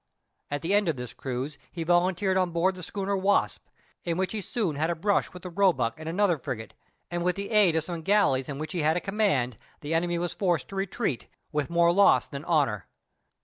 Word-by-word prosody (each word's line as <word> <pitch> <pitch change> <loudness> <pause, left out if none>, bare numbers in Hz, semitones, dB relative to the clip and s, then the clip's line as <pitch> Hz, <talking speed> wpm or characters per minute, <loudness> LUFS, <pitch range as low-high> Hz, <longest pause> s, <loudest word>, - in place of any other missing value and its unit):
At 145 0 -3
the 175 +4 +1
end 205 -3 +3
of 160 - 0
this 125 -2 -7
cruise, 135 +2 -5
he 170 - -4
volunteered 180 +3 +2
on 185 -1 +2
board 170 +3 +1
the 185 - -10
schooner 200 +3 -2
Wasp, 195 +1 +1 0.4
in 170 -1 -1
which 190 0 0
he 215 - -3
soon 195 - -2
had 155 +3 0
a 170 - 0
brush 200 +5 +1
with 180 -1 -11
the 180 - -6
Roebuck 170 -11 +2
and 160 0 -5
another 175 -2 +2
frigate, 110 -3 -6 0.4
and 175 0 -2
with 180 0 +1
the 200 +2 -5
aid 205 -6 +5
of 160 - +1
some 170 0 -5
galleys 160 -9 +2
in 140 - -4
which 155 +1 -5
he 175 - -1
had 155 +3 +2
a - - +1
command, 180 - 0 0.2
the 150 +2 -3
enemy 170 +1 +1
was 175 0 -2
forced 175 -7 0
to 195 - -8
retreat, 195 - -2 0.2
with 150 -1 -1
more 170 0 +4
loss 200 +2 +5
than 140 0 -7
honor. 140 - +1
170 Hz, 225 wpm, -27 LUFS, 150-190 Hz, 0.4 s, aid